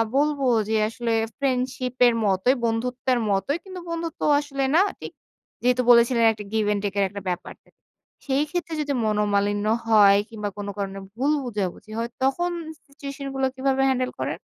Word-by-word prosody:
বলব 295 Hz, +1 st, +2 dB, 0.3 s
যে 220 Hz, -, +1 dB
আসলে 230 Hz, 0 st, -2 dB, 0.2 s
ফ্রেন্ডশিপের 255 Hz, -2 st, +1 dB
মতোই, 200 Hz, +7 st, +3 dB
বন্ধুত্বের 245 Hz, +2 st, 0 dB
মতোই, 200 Hz, -, 0 dB
কিন্তু 375 Hz, -2 st, -8 dB
বন্ধুত্ব 335 Hz, -1 st, -4 dB, 0.2 s
আসলে 280 Hz, -2 st, -3 dB
না 350 Hz, -, +6 dB, 0.2 s
ঠিক। -, -, -7 dB, 0.5 s
যেহেতু 250 Hz, 0 st, +2 dB
বলেছিলেন 235 Hz, 0 st, +5 dB
একটা 210 Hz, -1 st, -7 dB
give 220 Hz, -1 st, +1 dB
and 205 Hz, -, -1 dB
take 200 Hz, -1 st, -2 dB
এর -, -, +4 dB
একটা 200 Hz, 0 st, -8 dB
ব্যাপার। 175 Hz, -, -4 dB, 0.7 s
সেই 275 Hz, +2 st, +2 dB
ক্ষেত্রে 345 Hz, -2 st, -3 dB
যদি 285 Hz, -1 st, -1 dB
মনোমালিন্য 205 Hz, -1 st, +1 dB, 0.2 s
হয়, 205 Hz, -3 st, +6 dB
কিংবা 210 Hz, -2 st, -4 dB
কোন 205 Hz, 0 st, -5 dB
কারণে 195 Hz, -1 st, -4 dB, 0.2 s
ভুল 275 Hz, +5 st, +1 dB
বুঝাবুঝি 210 Hz, -3 st, -4 dB
হয় 230 Hz, +1 st, -2 dB
তখন 345 Hz, +7 st, +1 dB, 0.4 s
সিচুয়েশন 275 Hz, 0 st, -8 dB
গুলো 270 Hz, -, +1 dB
কিভাবে 270 Hz, 0 st, +1 dB
handle 255 Hz, -1 st, 0 dB
করেন? -, -, -2 dB
245 Hz, 155 wpm, -24 LUFS, 210-275 Hz, 0.7 s, না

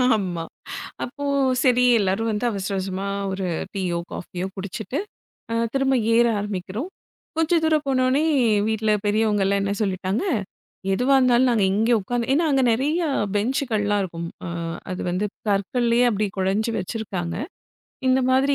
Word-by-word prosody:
ஆமா. 180 Hz, -5 st, -2 dB, 0.6 s
அப்போ 285 Hz, +3 st, -6 dB, 0.4 s
சரி 250 Hz, -1 st, +4 dB, 0.2 s
எல்லாரும் 205 Hz, +3 st, 0 dB
வந்து 215 Hz, +3 st, -1 dB
அவசர 200 Hz, -2 st, -3 dB
அவசரமா 190 Hz, 0 st, -3 dB, 0.3 s
ஒரு 190 Hz, 0 st, -3 dB, 0.3 s
டீயோ, 180 Hz, -3 st, -1 dB
காஃபியோ 180 Hz, +1 st, -5 dB
குடிச்சிட்டு, 200 Hz, +7 st, -5 dB, 0.5 s
அ, -, -, 0 dB, 0.2 s
திரும்ப 270 Hz, -1 st, +2 dB, 0.2 s
ஏற 235 Hz, 0 st, +5 dB
ஆரம்பிக்கிறோம். 205 Hz, -, -4 dB, 0.5 s
கொஞ்சம் 325 Hz, +1 st, +3 dB
தூரம் 310 Hz, -2 st, +2 dB
போனோனே, 260 Hz, +2 st, +2 dB, 0.4 s
வீட்ல 220 Hz, -1 st, +1 dB
பெரியவங்க 210 Hz, -1 st, +2 dB
எல்லாம் 200 Hz, 0 st, +2 dB
என்ன 200 Hz, 0 st, 0 dB
சொல்லிட்டாங்க, 190 Hz, -, -1 dB, 0.7 s
எதுவா 255 Hz, +7 st, +3 dB
இருந்தாலும் 255 Hz, 0 st, +4 dB
நாங்க 215 Hz, -4 st, +2 dB
இங்க 225 Hz, +4 st, +2 dB
உக்காந்து 240 Hz, +4 st, -2 dB
ஏன்னா 320 Hz, +4 st, +3 dB
அங்க 270 Hz, -, +3 dB
நிறைய 290 Hz, +9 st, +1 dB, 0.3 s
பெஞ்சுகள்லாம் 210 Hz, -3 st, +1 dB
இருக்கும். 170 Hz, -2 st, -5 dB, 0.2 s
ஆ, -, -, -4 dB, 0.4 s
அது 185 Hz, -, -4 dB
வந்து 185 Hz, +4 st, 0 dB, 0.2 s
கற்களையே 235 Hz, +4 st, +2 dB
அப்படி 210 Hz, -1 st, 0 dB
குடஞ்சு 195 Hz, +4 st, +1 dB
வச்சிருக்காங்க. 185 Hz, -4 st, -3 dB, 0.7 s
இந்த 260 Hz, +1 st, +4 dB
மாதிரி 270 Hz, +2 st, +3 dB
215 Hz, 135 wpm, -23 LUFS, 195-255 Hz, 0.7 s, ஏற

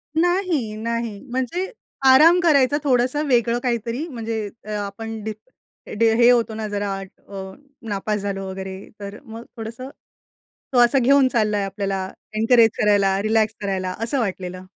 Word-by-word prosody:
नाही, 345 Hz, -, +1 dB
नाही. 230 Hz, -2 st, -3 dB
म्हणजे 260 Hz, -, -2 dB, 0.3 s
आराम 310 Hz, +7 st, +7 dB
करायचा 285 Hz, -3 st, +4 dB
थोडंसं 260 Hz, +2 st, +1 dB
वेगळं 240 Hz, -2 st, +2 dB
काहीतरी. 240 Hz, +5 st, -2 dB
म्हणजे 225 Hz, -5 st, -4 dB, 0.2 s
अ, 215 Hz, -, -11 dB
आपण 220 Hz, +2 st, -6 dB
डी 220 Hz, 0 st, -3 dB, 0.7 s
ड -, -, +3 dB
हे 240 Hz, 0 st, +6 dB
होतो 235 Hz, -2 st, +3 dB
ना 220 Hz, -1 st, -4 dB
जरा 205 Hz, -1 st, -2 dB
अ, 190 Hz, 0 st, -10 dB, 0.4 s
नापास 210 Hz, +1 st, -2 dB
झालो 195 Hz, -1 st, -4 dB
वगैरे. 190 Hz, 0 st, -6 dB, 0.2 s
तर 200 Hz, 0 st, -8 dB
मग 225 Hz, -1 st, -9 dB
थोडंसं, 230 Hz, +4 st, -7 dB, 0.8 s
तो -, -, +2 dB
असं 270 Hz, +3 st, +2 dB
घेऊन 275 Hz, +1 st, +5 dB
चाललाय 210 Hz, -3 st, +1 dB
आपल्याला. 195 Hz, -1 st, -3 dB, 0.3 s
एन्करेज 225 Hz, 0 st, +5 dB
करायला, 200 Hz, -2 st, +3 dB
रिलॅक्स 220 Hz, 0 st, +1 dB
करायला 190 Hz, -2 st, -2 dB
असं 250 Hz, +4 st, -1 dB
वाटलेलं. 185 Hz, -4 st, -4 dB
225 Hz, 140 wpm, -22 LUFS, 200-250 Hz, 0.8 s, आराम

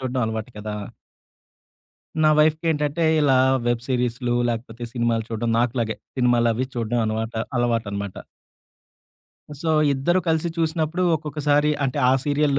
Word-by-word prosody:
చూడ్డం 130 Hz, 0 st, -2 dB
అలవాటు 110 Hz, +1 st, -4 dB
కదా! 105 Hz, 0 st, -5 dB, 1.5 s
నా 155 Hz, -, +5 dB
వైఫ్‌కేంటంటే, 155 Hz, 0 st, +1 dB, 0.2 s
ఇలా 135 Hz, -3 st, +4 dB, 0.3 s
వెబ్ 120 Hz, -1 st, 0 dB
సీరీస్లు, 125 Hz, -1 st, 0 dB
లాకపోతే 115 Hz, 0 st, -4 dB
సినిమాలు 115 Hz, -2 st, 0 dB
చూడ్డం 115 Hz, +1 st, -1 dB
నాకులాగే 115 Hz, -3 st, 0 dB, 0.2 s
సినిమాలవి 120 Hz, -1 st, +2 dB
చూడ్డం 120 Hz, 0 st, -1 dB
అనవాట 110 Hz, +1 st, -3 dB, 0.2 s
అలవాటనమాట. 100 Hz, -5 st, -1 dB, 1.4 s
సో, 165 Hz, -, -1 dB, 0.2 s
ఇద్దరూ 170 Hz, +7 st, +1 dB
కలిసి 160 Hz, +1 st, +1 dB
చూసినప్పుడు 160 Hz, +1 st, 0 dB
ఒక్కొక్కసారి 150 Hz, -1 st, +1 dB
అంటే, 135 Hz, +2 st, -2 dB
ఆ -, -, +4 dB
సీరియల్ 145 Hz, -1 st, +1 dB
125 Hz, 115 wpm, -23 LUFS, 115-150 Hz, 1.5 s, నా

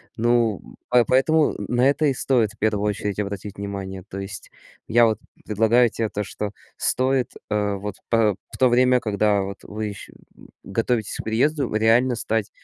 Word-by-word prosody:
Ну, 115 Hz, -3 st, +2 dB, 0.3 s
по 125 Hz, -1 st, +5 dB
поэтому 150 Hz, +5 st, +3 dB
на 125 Hz, +2 st, +3 dB
это 145 Hz, +2 st, +1 dB
и 140 Hz, -, +3 dB
стоит 120 Hz, -5 st, +1 dB
в -, -, -24 dB
первую 105 Hz, -1 st, 0 dB
очередь 105 Hz, -1 st, -2 dB
обратить 100 Hz, -1 st, -5 dB
внимание. 95 Hz, -2 st, -5 dB
То 95 Hz, -, -7 dB
есть, 95 Hz, -1 st, -7 dB, 0.4 s
я 120 Hz, +1 st, +5 dB
вот 110 Hz, -2 st, +1 dB, 0.3 s
предлагаю 115 Hz, +3 st, +3 dB
те 115 Hz, 0 st, -2 dB
то, 105 Hz, 0 st, -3 dB
что 105 Hz, +1 st, -5 dB, 0.3 s
стоит, 130 Hz, 0 st, +1 dB, 0.2 s
э, 105 Hz, -1 st, 0 dB
вот 100 Hz, 0 st, -5 dB
по 110 Hz, -3 st, +3 dB, 0.2 s
в -, -, -7 dB
то 130 Hz, -, +4 dB
время, 125 Hz, +1 st, +4 dB
когда 105 Hz, -1 st, +1 dB
вот 95 Hz, 0 st, -5 dB
вы 110 Hz, +1 st, -5 dB
ещ 100 Hz, -1 st, -8 dB, 0.5 s
готовитесь 115 Hz, +2 st, -1 dB
к -, -, -5 dB
переезду, 130 Hz, +4 st, 0 dB
реально 115 Hz, +3 st, +3 dB
стать 110 Hz, -1 st, -1 dB
110 Hz, 170 wpm, -23 LUFS, 105-125 Hz, 0.5 s, по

